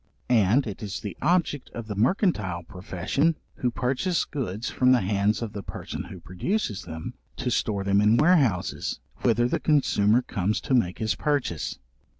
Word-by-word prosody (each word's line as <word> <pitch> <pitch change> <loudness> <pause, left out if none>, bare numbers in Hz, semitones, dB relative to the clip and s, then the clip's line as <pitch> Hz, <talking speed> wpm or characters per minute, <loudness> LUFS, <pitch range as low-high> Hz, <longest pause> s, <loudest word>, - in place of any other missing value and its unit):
And 115 +3 +4
it 105 -4 -6
is 100 -3 -4
the 105 - -6
object 165 -4 +1
of 115 - -5
the 110 - -4
mercantile 110 - +1
profession, 95 - -1 0.2
who 125 - 0
purchase 130 +9 0
goods 115 -6 -4
from 130 0 +3
the 125 - +4
hands 100 +3 +1
of 110 - -5
the 100 - -5
person - - -6
who - - -9
produces 105 - -2
them, 80 0 -6 0.2
to - - -2
store 100 -2 0
them 100 +1 +3
in 105 +2 +5
warehouses, 145 - +2 0.2
whither 120 0 +2
the - - 0
consumer 125 -6 +3
comes 100 0 -1
to - - -2
make 100 -8 +2
his 110 -2 0
purchase. 140 - -1
110 Hz, 165 wpm, -26 LUFS, 100-135 Hz, 0.2 s, in